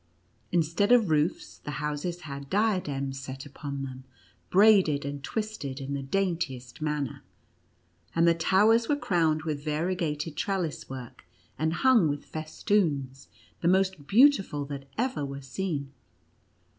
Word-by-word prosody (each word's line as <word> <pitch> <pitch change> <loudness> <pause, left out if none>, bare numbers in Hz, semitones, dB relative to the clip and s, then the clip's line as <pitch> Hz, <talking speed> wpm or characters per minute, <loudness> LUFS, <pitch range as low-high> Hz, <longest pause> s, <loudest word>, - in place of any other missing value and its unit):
Instead 175 +6 +2
of 230 -8 +5
roofs, 155 +2 0
the - - -8
houses 150 +4 -3
had 140 -3 -7
diadems 150 -11 0
set 135 +1 -7
upon 140 -1 -6
them, 130 -1 -7 0.5
braided 190 -8 +5
and 140 0 -5
twisted 210 -12 -4
in 135 +1 -4
the 140 - -2
daintiest 145 -6 -2
manner; 150 -4 -2 0.9
and 165 0 +4
the 170 - +6
towers 210 +7 +3
were 295 - +4
crowned 165 - +1
with 150 -3 -3
variegated 155 -1 -2
trellis 185 -6 -2
work, 130 -2 -9 0.3
and 160 +1 0
hung 240 -10 +6
with 145 -1 -3
festoons 155 - -1 0.3
the 170 - +1
most 185 -5 +2
beautiful 205 - +4
that 140 -1 -6
ever 250 - -1
were 140 0 -5
seen. 140 0 -4
155 Hz, 130 wpm, -28 LUFS, 140-190 Hz, 0.9 s, the